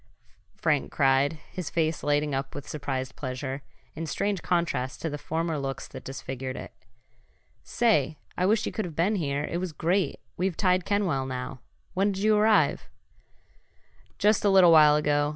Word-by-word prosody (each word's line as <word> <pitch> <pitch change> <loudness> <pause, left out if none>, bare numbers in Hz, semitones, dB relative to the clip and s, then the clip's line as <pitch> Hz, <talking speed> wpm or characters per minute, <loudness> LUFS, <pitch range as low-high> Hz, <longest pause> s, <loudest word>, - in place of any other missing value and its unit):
Frank - - 0
cried, 135 +2 +3 0.2
his 180 -4 -5
face 160 -1 0
lighting 145 0 +1
up 135 0 -3
with 145 - -7
surprised 135 -3 -4
pleasure, 130 +1 -4 0.3
in 165 +1 -5
strange 200 +3 -1
contrast 170 -8 -1
to 160 - -1
the 150 - -5
former 160 0 -2
looks 135 -1 -4
that - - -10
disfigured 130 -1 -5
it. - - -8 0.9
"Say, 160 - +1 0.2
I 180 - +1
wish 220 +2 +2
you - - -2
could 215 - -3
have 165 -4 -8
been 195 +7 +1
here. 145 -4 -1
It 170 - -3
was 180 -3 -4
great! 175 +2 0 0.2
We've 180 -1 -1
tied 185 -2 +2
Kenwell 180 -10 0
now. 130 0 -5 0.3
When'd 195 +1 +1
you 215 +2 +3
arrive?" 215 0 +3 1.3
"Just 210 +1 +3
a 205 - +4
little 190 -3 +7
while 150 -2 +7
ago. 145 -1 +2
155 Hz, 165 wpm, -27 LUFS, 140-185 Hz, 1.3 s, little